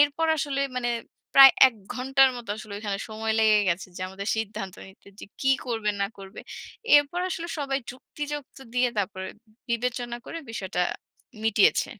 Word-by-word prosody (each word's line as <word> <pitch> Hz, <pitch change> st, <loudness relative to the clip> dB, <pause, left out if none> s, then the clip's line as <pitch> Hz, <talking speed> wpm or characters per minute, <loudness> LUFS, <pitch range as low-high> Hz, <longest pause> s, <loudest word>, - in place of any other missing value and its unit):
এরপর 290 Hz, +3 st, +3 dB
আসলে 275 Hz, -1 st, -1 dB, 0.2 s
মানে 240 Hz, -1 st, -1 dB, 0.5 s
প্রায় 270 Hz, -1 st, +11 dB, 0.2 s
১ 240 Hz, -, -13 dB, 0.2 s
ঘন্টার 270 Hz, +1 st, +4 dB
মতো 235 Hz, -4 st, -8 dB
আসলে 215 Hz, -1 st, -9 dB
ওখানে 205 Hz, -2 st, -3 dB
সময় 220 Hz, 0 st, -2 dB
লেগে 215 Hz, -1 st, +5 dB
গেছে 175 Hz, +2 st, -1 dB
যে, -, -, -8 dB
আমাদের 195 Hz, +2 st, -6 dB
সিদ্ধান্ত 210 Hz, -3 st, -4 dB
নিতে 190 Hz, +1 st, -18 dB
যে -, -, -7 dB, 0.2 s
কী 265 Hz, -, +2 dB, 0.2 s
করবে 225 Hz, -3 st, -1 dB
না 200 Hz, -, +2 dB
করবে। 195 Hz, 0 st, -10 dB, 0.6 s
এরপর 290 Hz, +5 st, +2 dB
আসলে 340 Hz, 0 st, -4 dB
সবাই 275 Hz, -1 st, -1 dB
যুক্তিযুক্ত 290 Hz, +2 st, -7 dB, 0.2 s
দিয়ে 250 Hz, 0 st, +3 dB
তারপরে 190 Hz, -1 st, -3 dB, 0.4 s
বিবেচনা 240 Hz, 0 st, -2 dB
করে 330 Hz, -, -6 dB
বিষয়টা 190 Hz, -5 st, -2 dB, 0.6 s
মিটিয়েছে। 220 Hz, -2 st, +4 dB
235 Hz, 155 wpm, -26 LUFS, 205-270 Hz, 0.6 s, প্রায়